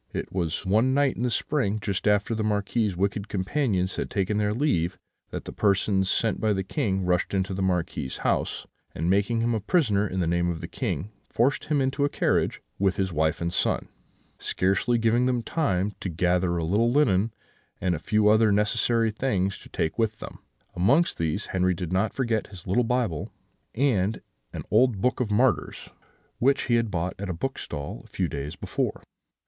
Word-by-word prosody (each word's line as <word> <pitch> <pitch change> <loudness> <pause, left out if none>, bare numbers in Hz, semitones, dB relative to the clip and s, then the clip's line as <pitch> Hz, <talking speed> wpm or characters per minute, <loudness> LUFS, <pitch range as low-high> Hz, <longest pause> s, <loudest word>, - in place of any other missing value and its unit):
It - - -4
was 85 -2 -2
one 110 +7 +3
night 140 -1 +2
in - - -5
the 125 - +1
spring, 120 -4 0
just 100 -1 -2
after 105 +2 +2
the 110 - -2
Marquis's 105 -1 0
wicked 100 +2 -1
companions 95 -2 0
had - - -2
taken 100 0 0
their 105 -1 +1
leave, 95 - 0 0.3
that - - -6
the - - -6
persons 100 -1 +2
sent 110 +1 0
by 110 -1 +2
the 95 -1 -1
King 95 - -1
rushed 90 +2 +1
into 95 0 0
the 95 - -3
Marquis's 90 -8 -1
house, - - 0 0.3
and 85 +3 0
making 105 +4 +2
him 120 +1 +1
a 110 - 0
prisoner 105 - +2
in 95 -1 -3
the 90 - +1
name 85 +1 +1
of 85 -2 -3
the - - -6
King, 90 +9 -3 0.2
forced 125 +5 +1
him 150 -2 +1
into 135 +2 0
a 145 - +2
carriage, - - 0 0.2
with 95 -2 +2
his 95 -2 -1
wife 80 +1 +1
and 85 +1 -1
son, - - 0 0.5
scarcely 100 +6 +1
giving 115 +2 +2
them 125 -2 0
time 105 - 0
to 95 - -4
gather 90 +2 +1
together 85 0 0
a 85 - -1
little 105 +8 +2
linen, 115 -7 +3 0.5
and 90 -1 +1
a 80 - -2
few 105 +5 +2
other 110 0 +5
necessary 110 +2 +2
things, 100 -5 -1
to - - -14
take 80 +7 -2
with 110 -1 +1
them: - - -9 0.4
amongst 135 - +3
these, 80 +5 -1
Henri 90 -1 +2
did 90 0 -4
not 100 +3 +1
forget 115 -3 -1
his 95 -4 -12
little 100 +7 +2
Bible, 115 -10 -1 0.5
and 110 -6 +1 0.3
an - - -6
old 125 -6 +4
Book 125 +6 +1
of 125 -4 0
Martyrs, 105 - +1 0.5
which 135 +3 +3
he 120 - 0
had 115 -1 0
bought 90 -1 -2
at 100 -1 -4
a - - -1
bookstall 75 - -5
a - - -17
few - - -1
days 75 +3 -5
before. - - -3
100 Hz, 195 wpm, -26 LUFS, 90-115 Hz, 0.5 s, other